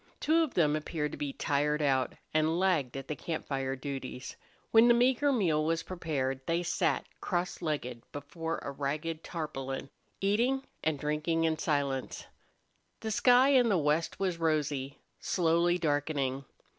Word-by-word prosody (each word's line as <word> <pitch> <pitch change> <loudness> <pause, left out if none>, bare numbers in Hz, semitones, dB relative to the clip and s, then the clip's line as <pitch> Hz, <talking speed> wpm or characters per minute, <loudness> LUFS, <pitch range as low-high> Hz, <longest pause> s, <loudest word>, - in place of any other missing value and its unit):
Two 325 +2 +3
of 315 -6 -1
them 150 -4 +3
appeared 150 -1 -2
to - - -7
be 145 -1 -2
tired 150 +1 0
out, 135 -3 +1 0.2
and 155 +1 +2
lagged 160 -10 +1
at 135 0 -7
the 150 - -3
camp 160 +1 -4
fire 135 -1 -2
duties. 130 -2 -6 0.4
When 225 +1 +7
the 240 - +6
meager 260 +4 +3
meal 170 - +2
was 165 +1 0
prepared 145 -7 -2
they 170 +1 +1
sat, 170 - 0 0.2
cross 180 -1 -2
legged, 135 -7 -3
before 160 +3 -4
a - - -4
ragged 150 +4 -3
tarpaulin, 135 -5 -5 0.3
eating 240 +7 +1 0.2
and 160 -2 +1
drinking 150 +3 0
in 160 -1 +1
silence. 140 -3 -1 0.8
The 220 - -3
sky 250 +4 +5
in 255 -4 +5
the 195 - +3
west 155 +1 0
was 185 -3 -1
rosy, 145 -4 0 0.2
slowly 175 0 +2
darkening. 145 -4 -1
155 Hz, 155 wpm, -31 LUFS, 140-175 Hz, 0.8 s, When